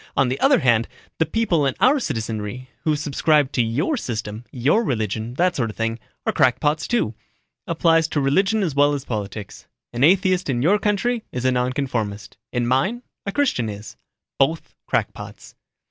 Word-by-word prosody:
On 135 -2 +3
the 130 - -2
other 270 -2 +4
hand, 115 -3 +3 0.3
the 160 - +2
people 205 -9 +1
in 135 - -1
our 275 +3 +4
citizenry 115 - -4
who 155 -1 +3
subscribe 150 -1 +2
to 125 - +1
your 125 - 0
system, 110 - -5
your 140 - +2
religion, 110 - -2
that 180 +3 +2
sort 115 -4 -1
of 105 - -8
thing, 115 0 -2 0.3
are - - +1
crackpots, 150 +4 +2
too. 235 - 0 0.5
Applies 165 -1 +3
to 155 - -1
religion 195 +10 +2
as 165 -6 -1
well 145 +1 +3
as 140 - -6
politics. 105 -2 -6 0.3
An 120 +2 0
atheist 185 +1 +3
in 120 -2 0
your 200 +7 +4
country 215 +3 0
is 125 0 -4
a 130 - +4
nonconformist 125 -5 -2 0.2
in 120 -1 0
mine, 135 - +1 0.2
a - - 0
Christian 195 - 0
is. 105 +1 -8 0.4
Both 155 +4 +1
crackpots." - - -3
135 Hz, 170 wpm, -22 LUFS, 120-175 Hz, 0.5 s, other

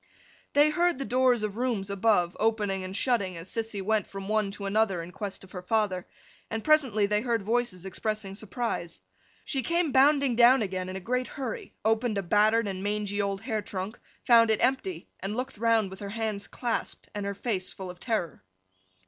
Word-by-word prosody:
They 295 +1 +5
heard 345 -1 +2
the 275 - -3
doors 250 -3 +3
of 210 0 -3
rooms 230 -6 -1
above, 200 -3 +2
opening 210 -3 +1
and 185 +1 -4
shutting 200 -7 +1
as 165 +3 -8
Sissy 225 -3 -2
went 215 +1 +1
from 195 0 -7
one 215 -1 +1
to 200 - -6
another 195 -3 +1
in 170 - -9
quest 195 +1 -5
of 190 - -15
her 180 - -6
father; 190 -2 0 0.4
and 225 -1 -3
presently 265 -10 +4
they 210 +1 +1
heard 230 -3 0
voices 220 -4 -1
expressing 210 0 -3
surprise. 210 -4 -4 0.5
She 270 - -1
came 335 +4 +1
bounding 275 -1 +4
down 240 +1 +6
again 185 -2 -3
in 185 - -5
a - - -3
great 250 +6 -1
hurry, 260 -5 -6
opened 225 0 +2
a 200 - -1
battered 210 +4 +3
and 190 -1 -4
mangy 205 0 -1
old 200 -1 -2
hair 220 -3 -2
trunk, 195 +3 -5 0.3
found 230 -2 +6
it 220 - +2
empty, 270 +9 0
and 200 +4 -4
looked 255 -4 -4
round 225 -4 +2
with 190 - -9
her 200 - -6
hands 215 -1 -3
clasped 240 -2 -3
and 205 -1 -3
her 200 0 -3
face 195 -3 -2
full 185 -2 -6
of 180 - -15
terror. 180 - -2
215 Hz, 195 wpm, -28 LUFS, 195-240 Hz, 0.5 s, down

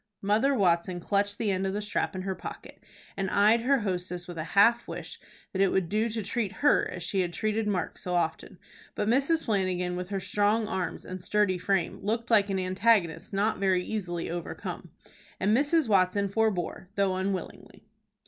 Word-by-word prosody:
Mother 220 +8 +3
Watson 175 -3 +1
clutched 200 +3 0
the 215 -3 0
end 190 0 0
of 190 - -2
the 205 - -2
strap 210 - -2
in 185 - -4
her 190 0 -2
pocket, - - -9 0.3
and 195 -1 -2
eyed 215 +4 +4
her 265 +1 +2
hostess 180 -3 -3
with 175 -2 -7
a - - -1
half 235 +4 +5
wish - - -7 0.3
that 190 - 0
it 195 - +5
would 185 -2 0
do 215 +4 +1
to 220 -1 -3
treat 205 0 -2
her 290 - +4
as 180 - -6
she 190 +2 0
had 175 -1 -2
treated 215 +3 -1
Mark 195 -4 -2
so 180 -1 -3
often; 170 +2 -2 0.4
but 210 - -1
Mrs. 275 +7 +2
Flanagan 185 -4 0
with 180 +1 -5
her 200 -1 -2
strong 210 +3 +1
arms 190 -5 -3
and 185 -1 -7
sturdy 195 -1 +1
frame 190 -2 0
looked 230 +4 -2
like 205 -2 +5
an 195 - 0
antagonist 185 -1 +1
not 205 +1 0
very 190 -2 +2
easily 175 -6 -3
overcome, 175 -1 -6 0.5
and 205 +3 +3
Mrs. 295 +2 +2
Watson 200 0 +2
forbore, 195 -4 -1
though 195 -2 +1
unwillingly. 190 -1 -5
195 Hz, 185 wpm, -28 LUFS, 185-215 Hz, 0.5 s, half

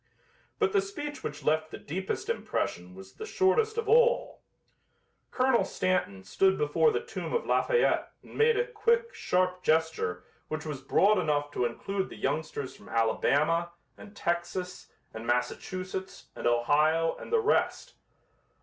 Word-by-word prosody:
But 420 -2 +1
the 400 - +4
speech 315 -7 -6
which 150 - -5
left 155 +1 +1
the - - -7
deepest 190 +6 -4
impression 90 +1 -3
was 95 0 -12
the - - -8
shortest 435 +4 +2
of 460 -1 -2
all. 485 +3 +3 0.9
Colonel 255 -2 +2
Stanton 175 - -1
stood 190 - +2
before 150 - +3
the 440 +2 -2
tomb 470 - -4
of 475 - 0
Lafayette 485 -1 +2
and - - -14
made 455 0 +4
a 480 - +2
quick, 470 0 +1
sharp 180 0 0
gesture 160 - 0 0.2
which 155 0 -4
was 145 -3 -5
broad 200 +9 +3
enough 145 -3 0
to 125 - 0
include 190 +11 -3
the - - -10
youngsters 145 -2 -3
from - - -15
Alabama 155 +9 +1 0.2
and 205 0 -13
Texas 175 +1 -3 0.2
and 110 +1 -7
Massachusetts 185 +10 -3
and - - -2
Ohio 150 +7 +2
and - - -10
the 460 - +4
rest. 445 0 0
180 Hz, 150 wpm, -29 LUFS, -, 0.9 s, the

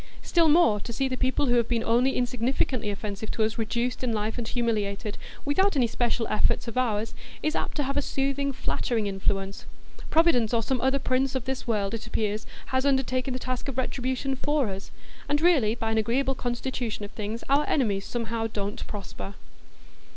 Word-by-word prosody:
Still 335 -2 +4
more, 300 -10 +5
to 235 - -6
see 265 +4 0
people 255 +2 +1
who 245 - +2
have 235 -1 +2
been 235 -2 0
only 245 +4 +3
insignificantly 245 -1 0
offensive 205 +1 -4
to 220 - +1
us 220 +1 -1
reduced 235 +3 -1
in 250 - +1
life 215 +1 -1
and 230 - -3
humiliated, 215 -3 -1 0.3
without 380 +6 +3
any 260 -3 +4
special 235 0 0
effort 215 - +2
of 235 - -5
ours, 225 -3 0 0.3
is 310 +1 +1
apt - - -2
to 295 - +2
have 275 +1 -2
a - - +3
soothing, 275 0 0
flattering 235 -4 -1
influence. 195 0 -2 0.4
Providence 265 -9 +4
or 230 - +2
some 255 +2 0
other 265 +1 +3
prince 265 0 +1
of 255 -3 -1
this 265 -1 -3
world, 210 -3 0
it 230 +1 -4
appears, 215 -1 -1 0.3
has 260 0 +3
undertaken 265 -2 +1
the - - -1
task 255 +1 -3
of 270 -2 -4
retribution 260 +1 -1
for 290 -3 +1
us; 195 0 -6 0.4
and 290 0 +3
really, 290 -10 +4
by 225 -1 -2
an 220 - +2
agreeable 255 +5 +1
constitution 240 -3 -3
of 205 - -10
things, 215 +2 -4
our 285 +2 +3
enemies 205 -8 +2
somehow 230 -1 -2
don't 205 -2 -4
prosper. 200 -1 -7
240 Hz, 190 wpm, -27 LUFS, 220-265 Hz, 0.4 s, more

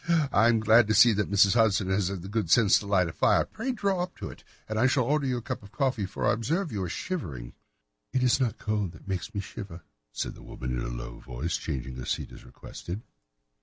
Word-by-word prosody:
Ha! 160 -5 +2
I 110 +3 +5
am 115 -1 +3
glad 110 +1 +6
to 110 - +2
see 115 +2 +7
that 105 -1 -1
Mrs. 100 -1 +5
Hudson 105 -4 +2
has 95 -1 +1
had 95 -2 -4
the - - -7
good 105 -4 -2
sense 105 +2 +5
to 100 - -8
light 95 -3 +3
the 85 - -5
fire. - - +3
Pray 245 +4 -4
draw 200 -6 0
up 180 0 -5
to - - -6
it, - - -15 0.2
and 110 0 -2
I 130 - +5
shall 130 0 +2
order 145 +2 +1
you 125 -1 0
a 120 - -6
cup 130 -1 -4
of 100 - -13
hot - - -26
coffee, 130 -8 0
for 100 - -4
I - - +4
observe 160 - -1
that - - -9
you 100 - -2
are 90 - -3
shivering." 75 - -5 0.6
"It 130 - +1
is 125 +1 +3
not 125 -5 0
cold 105 -5 -2
which - - -16
makes 95 +4 -4
me 100 - -1
shiver," 95 -4 -9 0.3
said - - -4
the - - -14
woman 65 0 -6
in - - -2
a - - -3
low - - -7
voice, 65 +7 -4
changing 65 -4 -4
her 65 - -6
seat - - -3
as - - -12
requested. 95 +6 -8
105 Hz, 265 wpm, -28 LUFS, 90-125 Hz, 0.6 s, see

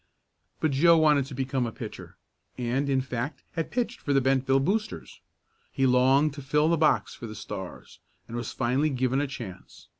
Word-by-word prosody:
But 155 - +1
Joe 165 +5 +5
wanted 150 -4 +4
to 135 - -8
become 130 -1 -1
a - - -4
pitcher, - - -9 0.4
and, 130 +3 -1
in 135 -1 +2
fact, 125 +2 -4
had 165 - -3
pitched 245 -1 -2
for 145 - -1
the 135 - +5
Bentville 135 0 +2
Boosters. 210 +4 -3 0.5
He 135 - +1
longed 130 +4 +4
to 140 - -8
fill 150 +3 +2
the 170 - +4
box 155 -1 +2
for 115 - -8
the 110 - -8
Stars, - - -8 0.3
and 115 - -7
was 120 -2 -4
finally 130 +5 +1
given 130 0 0
a 145 - -1
chance. 120 -9 -10
135 Hz, 185 wpm, -27 LUFS, 125-150 Hz, 0.5 s, Joe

